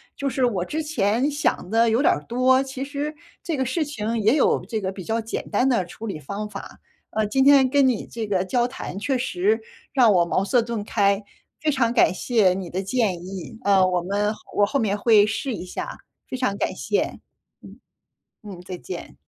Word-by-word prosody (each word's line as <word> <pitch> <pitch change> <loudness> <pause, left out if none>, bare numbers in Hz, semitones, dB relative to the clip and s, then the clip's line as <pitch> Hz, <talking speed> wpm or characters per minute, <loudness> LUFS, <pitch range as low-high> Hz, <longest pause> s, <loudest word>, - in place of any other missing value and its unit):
就 280 - -2
是 260 -1 +1
我 200 -7 0
之 305 - -3
前 250 -3 +1
想 290 -10 -1
的 225 +2 +3
有 225 +3 +2
点 - - +4
儿 - - -5
多， 255 +2 +3
其 270 0 -5
实 290 +2 -4 0.3
这 325 -4 -2
个 265 - 0
事 310 +6 0
情 235 -6 -3
也 220 +6 +4
有 - - +2
这 220 - -3
个 190 -1 -3
比 190 - -8
较 225 +5 -1
简 225 0 -5
单 245 +5 +2
的 235 -9 +2
处 215 +6 -8
理 190 -7 -4
方 200 +9 -5
法， 200 -1 -9 0.3
呃， 220 0 0
今 265 +5 +2
天 275 -2 +6
跟 280 +1 +4
你 250 -4 0
这 230 -1 -5
个 190 -2 0
交 240 +5 +1
谈 245 -6 -6
确 260 +6 0
实 360 - +1 0.3
让 245 -6 +5
我 175 -2 +4
茅 185 +3 0
塞 245 +4 +3
顿 230 -2 -3
开， 200 -2 +2 0.4
非 310 - 0
常 260 -5 +2
感 235 -5 +4
谢 210 -3 +2
你 185 -2 -5
的 185 +3 -2
建 195 -4 -1
议， 190 +2 -8
呃， 195 -2 +5
我 180 -1 +1
们 205 +4 0
后 - - -15 0.2
我 205 - +4
后 275 +7 -1
面 210 -4 0
会 210 -1 +5
试 225 +5 -2
一 185 - -6
下， 180 - -6 0.3
非 255 - -3
常 250 -6 0
感 - - -1
谢， - - -2 0.4
嗯， - - -13 0.7
嗯， 200 -4 -9
再 180 0 -7
见。 375 - -8
225 Hz, 230 characters per minute, -23 LUFS, 195-265 Hz, 0.7 s, 天